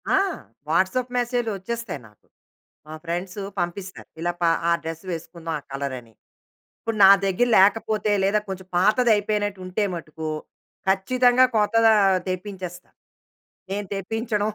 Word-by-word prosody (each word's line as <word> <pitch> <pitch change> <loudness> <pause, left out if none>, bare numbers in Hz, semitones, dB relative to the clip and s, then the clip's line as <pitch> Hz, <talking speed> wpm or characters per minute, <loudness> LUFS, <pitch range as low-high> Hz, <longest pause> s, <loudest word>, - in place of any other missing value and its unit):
ఆ! - - +4 0.5
వాట్సాప్ 215 +10 +1
మెసేజ్‌లు 240 -2 0
వచ్చేస్తాయి 205 - -5
నాకు. 105 -1 -26 0.6
మా 155 - -8
ఫ్రెండ్సు 180 +4 -4 0.2
పంపిస్తారు. 185 +2 -5
ఇలా 175 +1 0
ప - - +1 0.3
ఆ - - +3
డ్రెసు 165 +2 -6
వేసుకుందాం 165 0 -6
ఆ - - -16
కలర‌ని. 130 -4 -5 0.7
ఇప్పుడు 225 -1 -3
నా - - +10 0.2
దగ్గర 195 +6 +2
లేకపోతే 210 +2 +3
లేదా 200 +2 +3
కొంచెం 190 -1 -6
పాతదయిపోయినట్టు 210 -1 +2
ఉంటే 185 +4 -1
మటుకు 160 -1 -6 0.6
ఖచ్చితంగా 245 +6 +4
కొత్తదా 225 +1 +4 0.4
తెప్పించేస్తా. 185 -1 -6 0.8
నేను 205 0 -3
తెప్పించడం 210 +2 -2
195 Hz, 120 wpm, -24 LUFS, 175-220 Hz, 0.8 s, నా